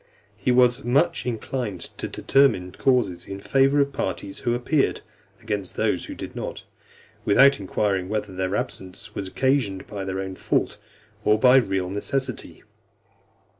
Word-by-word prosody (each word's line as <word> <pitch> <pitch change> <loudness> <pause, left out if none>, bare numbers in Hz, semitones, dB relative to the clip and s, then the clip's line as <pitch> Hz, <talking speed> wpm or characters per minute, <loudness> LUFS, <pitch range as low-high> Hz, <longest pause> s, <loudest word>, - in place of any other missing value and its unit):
He 125 - 0
was 125 +1 +4
much 145 +6 +1
inclined 115 -4 -3 0.2
to - - -2
determine 135 -10 +2
causes 100 -7 +1
in 95 0 -6
favour 135 +6 +3
of 140 0 0
the - - -18
parties 95 -2 -3
who 120 -2 0
appeared, 135 +4 +1 0.4
against 105 -4 -3
those - - 0
who - - -7
did - - -8
not, - - -5 0.6
without 135 +6 +5
inquiring 95 -1 -1
whether 105 -2 -3
their 95 +1 -2
absence 95 0 -5
was 100 - -4
occasioned 120 -4 0
by 100 -2 -6
their 95 0 -3
own 95 0 -4
fault, - - -1 0.4
or 105 0 +4
by 125 +3 +6
real 95 -6 0
necessity. 130 +7 -3
105 Hz, 150 wpm, -24 LUFS, 95-130 Hz, 0.6 s, by